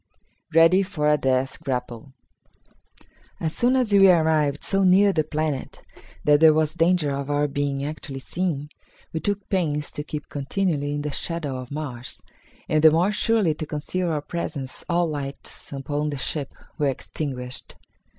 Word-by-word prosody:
Ready 165 +4 +6
for 185 -6 -1
a 150 - +5
Death 135 +2 0
Grapple. 125 -2 -4 1.3
As 160 -1 -2
soon 245 +2 +3
as 250 -5 +1
we 195 -1 +7
arrived 155 -4 +3
so 195 0 +2
near 195 +2 +5
the 155 - +2
planet 155 -2 -3 0.4
that 150 0 +5
there 160 -1 +7
was 155 -1 +1
danger 170 -3 +2
of 140 0 -3
our 145 0 +2
being 140 -1 -2
actually 150 -2 -6
seen, 150 -2 -3 0.4
we 160 - -1
took 205 +2 -2
pains 150 -6 0
to 150 - -4
keep 150 -1 -6
continually 145 0 -1
in 145 - -3
the 150 - -3
shadow 150 -3 -3
of 125 -1 -8
Mars, 140 -5 -5 0.5
and 155 0 +1
the 160 - +10
more 170 +6 +2
surely 210 -5 +2
to 155 0 -6
conceal 170 +4 -2
our 155 -2 -1
presence 145 -6 -5
all 175 0 +2
lights 140 -3 -6
upon 145 +2 -2
the 145 - -4
ships 140 +1 -3 0.3
were 145 - +2
extinguished. 130 -1 -4
150 Hz, 160 wpm, -24 LUFS, 140-170 Hz, 1.3 s, the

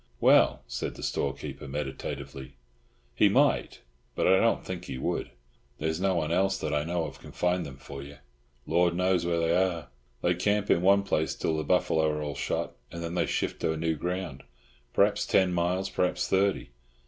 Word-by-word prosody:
"Well," - - +5
said - - -4
the - - -9
storekeeper, 70 0 -3
meditatively, 70 -1 -5 0.6
"he - - +4
might, - - +2 0.3
but - - +1
I 95 +1 +5
don't 115 - +2
think 90 -1 -5
he 65 - -5
would. - - -2 0.5
There's 80 +2 -2
no 95 -1 +2
one 80 -2 -1
else, 95 +2 +2
that 75 -2 -3
I 75 0 +1
know 85 0 -1
of, - - -8
can - - -12
find 90 -2 0
them 70 -1 -10
for 70 0 -9
you. 70 +1 -10 0.5
Lord 85 -1 +2
knows 90 -1 +1
where 85 -1 +1
they 85 +1 +2
are. 90 -5 0 0.3
They 90 - +3
camp 105 +3 +1
in 85 - +4
one 100 +2 +5
place 80 -5 0
till 80 - -1
the 80 - -1
buffalo 80 -3 +2
are 75 0 -2
all 75 -1 -3
shot, - - -2 0.2
and 85 0 -6
then 85 0 -4
they 90 - +1
shift - - -2
to 80 - 0
new 80 0 0
ground. 90 -2 -4 0.5
Perhaps - - +2
ten 95 -1 +3
miles, 90 +2 0
perhaps 90 -1 0
thirty. 95 -9 +1
85 Hz, 190 wpm, -28 LUFS, 75-90 Hz, 0.6 s, Well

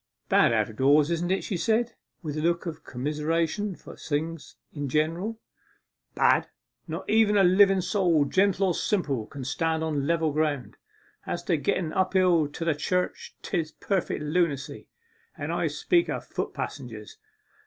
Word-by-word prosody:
'Bad - - +5
out - - +2
of 110 - -12
doors, 145 +4 +4
isn't 170 +1 -1
it?' 190 +1 0
she 195 - -3
said, 225 +6 +1 0.3
with 150 -2 -4
a 155 - -2
look 170 +2 0
of 160 -2 -6
commiseration 160 +8 -1
for - - -12
things 160 +1 -4 0.2
in 145 -2 -4
general. 170 - -1 0.8
'Bad? - - +3 0.4
Not - - -5
even 215 -1 +4
a 195 - +5
liven 190 +1 +5
soul, 175 -7 +2
gentle 195 +4 +2
or - - +1
simple, 145 - -1
can 140 +1 -8
stand 160 +4 -1
on 145 -3 -1
level 165 -2 +1
ground. 150 -4 -1 0.5
As 175 - -3
to 175 - +1
getten 155 +3 -1
up 190 0 +1
hill 180 -5 +4
to 150 +3 -6
the 165 - +3
church, 180 +5 -2
'tis 160 -3 -2
perfect 190 -6 -2
lunacy. 150 -3 -1 0.5
And - - -4
I - - 0
speak 345 -2 +1
of - - -3
foot - - -4
passengers. 115 -6 -7
165 Hz, 165 wpm, -27 LUFS, 150-185 Hz, 0.8 s, Bad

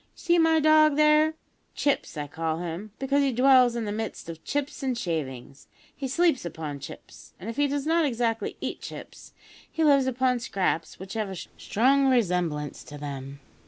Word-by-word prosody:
"You - - -38
see 345 -1 +2
my 325 -1 +4
dog 310 -1 +5
there 305 +1 +4 0.4
Chips 285 - -1
I 145 - -3
call 160 +2 -3
him, 175 +4 -5
because 275 +1 +1
he 275 -1 +2
dwells 255 -1 +5
in 235 -2 -2
the 205 - -3
midst 215 -5 -5
of 165 -1 -8
chips 290 +1 -3
and 260 -3 -1
shavings; 140 - -5 0.3
he 275 - -4
sleeps 325 +1 +2
upon 155 -4 -6
chips, - - -11
and 205 +5 -5
if - - -10
he 290 0 +3
does 285 0 -2
not 330 +1 +3
exactly 230 -4 -1
eat - - -4
chips, - - -10 0.4
he 325 - -1
lives 280 -3 +4
upon 255 -1 +1
scraps 185 -7 -2
which 190 +1 -8
have 215 -3 -2
a 190 - -6
strong 265 +9 +1
resemblance 180 - 0
to 145 - -9
them. 140 -1 -7
235 Hz, 185 wpm, -26 LUFS, 170-280 Hz, 0.4 s, dog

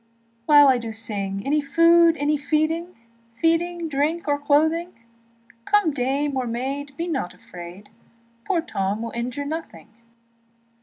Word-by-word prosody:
And 295 - +7
now 290 -1 +8
I 260 -2 +4
sing, 200 -3 -2
Any 295 +2 +1
food, 335 +2 +4
any 295 +1 +1
feeding, 310 +4 -1 0.4
Feeding, 335 +3 0
drink, 305 +3 -1
or 285 0 +1
clothing; 315 +4 +1 0.7
Come 415 -6 +3
dame 275 +2 -1
or 255 -2 -1
maid, 270 +4 -4
be 335 - -3
not 270 - -3
afraid, 175 +3 -12 0.6
Poor 360 -4 +1
Tom 200 - -3
will 230 - -5
injure 250 +4 -4
nothing. 290 - -7
290 Hz, 135 wpm, -23 LUFS, 245-330 Hz, 0.7 s, now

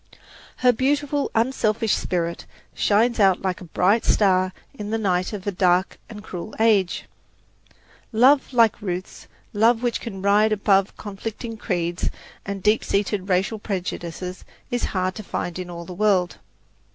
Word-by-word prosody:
Her 250 - +7
beautiful, 285 +3 0
unselfish 225 -2 +1
spirit 170 -1 -2 0.3
shines 225 +3 +2
out 195 -3 +4
like 185 -2 -2
a - - -8
bright 190 +6 +2
star 185 -2 +3 0.2
in 210 -6 -6
the 225 - 0
night 185 -4 0
of 205 -3 -6
a 205 - 0
dark 180 0 +1
and 210 -2 -9
cruel 185 +1 -7
age. 210 -5 +2 1.1
Love 260 +5 +4
like 230 -4 +3
Ruth's, 185 -2 -5 0.3
love 225 +3 +3
which 240 -1 0
can 195 -5 -7
rise 210 +2 +4
above 195 -1 +2
conflicting 220 +3 -6
creeds 175 -5 -2 0.4
and 195 -1 -4
deep 210 +1 +3
seated 200 -1 -1
racial 190 +4 +1
prejudices, 180 -2 -5 0.3
is 245 - 0
hard 185 -1 -1
to 215 - -8
find 175 -2 -4
in 180 -1 -6
all 170 -1 -7
the 180 - -8
world. 190 -2 +1
200 Hz, 150 wpm, -23 LUFS, 185-225 Hz, 1.1 s, Her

